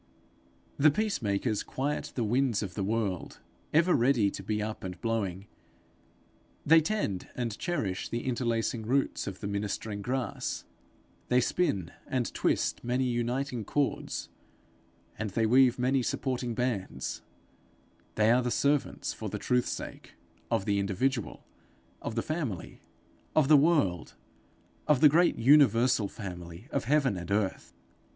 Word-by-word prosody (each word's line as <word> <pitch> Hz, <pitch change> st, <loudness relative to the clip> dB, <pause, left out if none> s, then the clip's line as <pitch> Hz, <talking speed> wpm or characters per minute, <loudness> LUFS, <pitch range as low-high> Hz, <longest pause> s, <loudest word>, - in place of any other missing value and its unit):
The 155 Hz, +2 st, +6 dB
peace 210 Hz, +2 st, -1 dB
makers 105 Hz, +1 st, 0 dB
quiet 145 Hz, +3 st, -3 dB
the 120 Hz, -, 0 dB
winds 120 Hz, 0 st, +1 dB
of 95 Hz, -3 st, -5 dB
the 100 Hz, -, -2 dB
world 100 Hz, -3 st, -2 dB, 0.3 s
ever 170 Hz, +4 st, +4 dB
ready 120 Hz, -5 st, +3 dB
to -, -, -6 dB
be 105 Hz, +2 st, -2 dB
up 110 Hz, +1 st, -4 dB
and 90 Hz, -1 st, -6 dB
blowing; 100 Hz, -4 st, -2 dB, 1.2 s
they 160 Hz, +2 st, +7 dB
tend 155 Hz, -, -2 dB
and 120 Hz, -4 st, -2 dB
cherish 125 Hz, -, -2 dB
the 120 Hz, -, -3 dB
interlacing 120 Hz, -1 st, -1 dB
roots 130 Hz, +5 st, 0 dB
of 95 Hz, -1 st, -6 dB
the 100 Hz, -, -3 dB
ministering 100 Hz, +1 st, -3 dB
grass; 125 Hz, +3 st, -3 dB, 0.6 s
they 125 Hz, -, +4 dB
spin 115 Hz, -, 0 dB, 0.2 s
and 125 Hz, -3 st, -1 dB
twist -, -, 0 dB
many 125 Hz, +2 st, 0 dB
uniting 125 Hz, 0 st, -1 dB
cords, 145 Hz, +6 st, -2 dB, 0.9 s
and 110 Hz, -1 st, -2 dB
they 110 Hz, +4 st, +1 dB
weave 125 Hz, +2 st, +5 dB
many 130 Hz, +2 st, +2 dB
supporting 125 Hz, -1 st, -2 dB
bands; 105 Hz, -, -2 dB, 0.9 s
they 110 Hz, +1 st, +4 dB
are 125 Hz, +2 st, +4 dB
the 125 Hz, -, -1 dB
servants, 140 Hz, +3 st, 0 dB
for -, -, -5 dB
the -, -, -4 dB
truth's 125 Hz, 0 st, +1 dB
sake, -, -, -7 dB, 0.3 s
of 95 Hz, -, 0 dB
the 100 Hz, -1 st, +1 dB
individual, 115 Hz, +5 st, -1 dB, 0.6 s
of 110 Hz, -, -4 dB
the 115 Hz, -, 0 dB
family, 150 Hz, -, -4 dB, 0.5 s
of 155 Hz, -4 st, +4 dB
the 155 Hz, -, +8 dB
world, 140 Hz, -, +2 dB, 0.7 s
of 150 Hz, -4 st, +4 dB
the 150 Hz, -, +8 dB
great 170 Hz, +4 st, +3 dB
universal 125 Hz, -4 st, +5 dB
family 90 Hz, 0 st, -8 dB
of 140 Hz, -, -1 dB
heaven 135 Hz, -6 st, +2 dB
and 85 Hz, -1 st, -7 dB
earth. 100 Hz, -1 st, -1 dB
120 Hz, 140 wpm, -29 LUFS, 100-135 Hz, 1.2 s, the